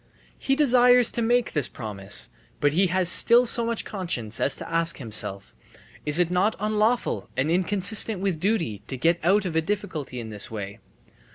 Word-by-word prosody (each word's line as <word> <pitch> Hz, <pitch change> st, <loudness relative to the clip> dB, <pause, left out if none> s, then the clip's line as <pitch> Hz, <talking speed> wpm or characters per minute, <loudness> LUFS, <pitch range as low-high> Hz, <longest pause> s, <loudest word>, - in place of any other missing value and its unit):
He 270 Hz, -, 0 dB
desires 250 Hz, -4 st, +5 dB
to 235 Hz, -, -3 dB
make 240 Hz, +1 st, +1 dB
this 145 Hz, -5 st, +1 dB
promise, 95 Hz, -, -3 dB, 0.3 s
but 145 Hz, -1 st, +1 dB
he 190 Hz, +4 st, +2 dB
has 185 Hz, 0 st, 0 dB
still 235 Hz, +7 st, +4 dB
so 235 Hz, 0 st, +3 dB
much 230 Hz, -1 st, -3 dB
conscience 125 Hz, -, -4 dB
as 140 Hz, -, +1 dB
to -, -, -8 dB
ask 165 Hz, 0 st, 0 dB
himself: 105 Hz, -5 st, -2 dB, 0.5 s
"Is 150 Hz, +1 st, +3 dB
it 175 Hz, -1 st, +2 dB
not 190 Hz, +5 st, +1 dB
unlawful 215 Hz, +3 st, -1 dB
and 145 Hz, +5 st, 0 dB
inconsistent 195 Hz, +3 st, +1 dB
with 190 Hz, -4 st, -2 dB
duty 170 Hz, -, -1 dB
to 130 Hz, -, -3 dB
get 165 Hz, +7 st, +1 dB
out 195 Hz, +4 st, +2 dB
of 170 Hz, -3 st, -4 dB
a 160 Hz, -, +2 dB
difficulty 160 Hz, -8 st, -5 dB
in 110 Hz, -2 st, -8 dB
this 105 Hz, -1 st, -3 dB
way?" 100 Hz, -2 st, -7 dB
180 Hz, 180 wpm, -24 LUFS, 130-215 Hz, 0.5 s, desires